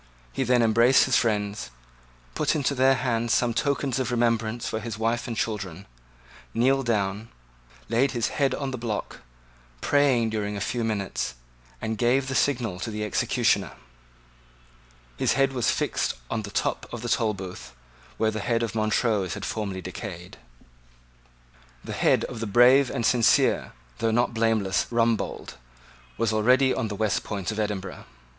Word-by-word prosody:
He - - -2
then 125 -1 +3
embraced 115 +3 +5
his 130 - +1
friends, 105 - 0 0.6
put - - 0
into 145 -2 0
their 135 0 +4
hands 120 -2 0
some 120 -1 +1
tokens 140 0 0
of 130 - -1
remembrance 115 -1 0
for 110 - -2
his 110 -1 -6
wife 115 +1 -1
and 115 -2 -4
children, 100 -4 -3 0.7
kneeled 130 +2 +2
down, 105 0 -1 0.6
laid 130 +4 +2
his 120 -4 -1
head 140 -3 0
on 140 -2 -3
the 130 - -5
block, 115 -3 -4 0.6
prayed 130 - +2
during 105 -1 -2
a - - -3
few 120 +4 -2
minutes, 100 - -2 0.4
and 110 - -3
gave 130 +3 +2
the - - -2
signal 120 -9 0
to 115 - -4
the 105 -1 -4
executioner. 105 - +1 1.4
His - - +2
head 135 0 +2
was 125 -4 +1
fixed - - 0 0.2
on 110 - -1
the 105 - -7
top - - -2
of 120 -1 -6
the - - -3
Tolbooth, 100 - -2 0.4
where 110 -1 +1
the 110 - -4
head 115 +2 0
of 115 - -3
Montrose 110 -3 0
had 105 - -5
formerly 100 -4 -4
decayed. 90 -2 -8 1.5
The - - -6
head - - +2
of 120 - -6
the 115 - -3
brave 125 +5 +5
and 120 -4 -2
sincere, 120 -2 +3 0.3
though 115 - +1
not 120 +2 +1
blameless 110 -4 +1
Rumbold, 115 - -1 0.6
was 115 -1 0
already 125 +5 +4
on 110 - -2
the 105 - -5
West 110 0 0
Port 100 0 -3
of 110 - -4
Edinburgh. 100 -3 -4
115 Hz, 160 wpm, -25 LUFS, 105-125 Hz, 1.5 s, embraced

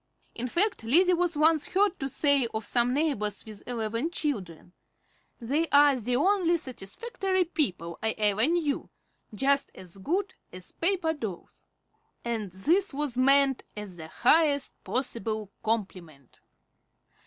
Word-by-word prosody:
In 245 - -3
fact, 385 - 0
Lizzie 350 +11 +4
was 350 -2 0
once 310 0 +3
heard 390 0 +1
to 270 - -3
say 280 -2 +2
of 220 -1 -3
some 240 +3 +1
neighbors 255 -8 -1
with 215 -2 -9
eleven 230 +4 -2
children, 195 - -4 0.7
"They 285 +8 -1
are 285 -1 +5
the 245 0 -2
only 385 +8 +2
really 340 +1 +3
satisfactory 375 - -3
people 180 - -2
I 220 - -1
ever 210 +3 +3
knew, 320 -4 -1 0.4
just 275 +5 +1
as 180 0 -11
good 375 - -2 0.2
as 185 0 -9
paper 340 -2 0
dolls;" 220 - -8 0.6
and 220 -5 -3
this 310 - +1
was 290 -3 -1
meant 270 +1 +4
as 205 -3 -7
the 160 -1 -8
highest 285 - +2
possible 220 -5 -2
compliment. 180 - -4
265 Hz, 135 wpm, -27 LUFS, 215-320 Hz, 0.7 s, are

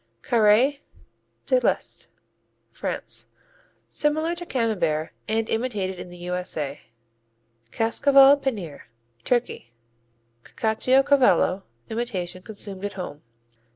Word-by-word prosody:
Carré 235 +5 +4 0.7
de - - +3
l'Est - - -1 0.6
France - - -3 0.6
Similar 310 +3 0
to 345 0 -6
Camembert, 175 - 0 0.2
and 220 +1 0
imitated 210 -6 -2
in 180 - -8
the 175 - -11
U.S.A. 175 -5 -4 0.9
Cascaval 275 - +5
Penir 200 - -4 0.4
Turkey 240 - -1 0.7
Cacciocavallo 250 - +3 0.3
imitation 190 -6 -4
consumed 200 -1 -6
at 205 - -3
home. 165 -6 -7
220 Hz, 85 wpm, -24 LUFS, 180-260 Hz, 0.9 s, Cascaval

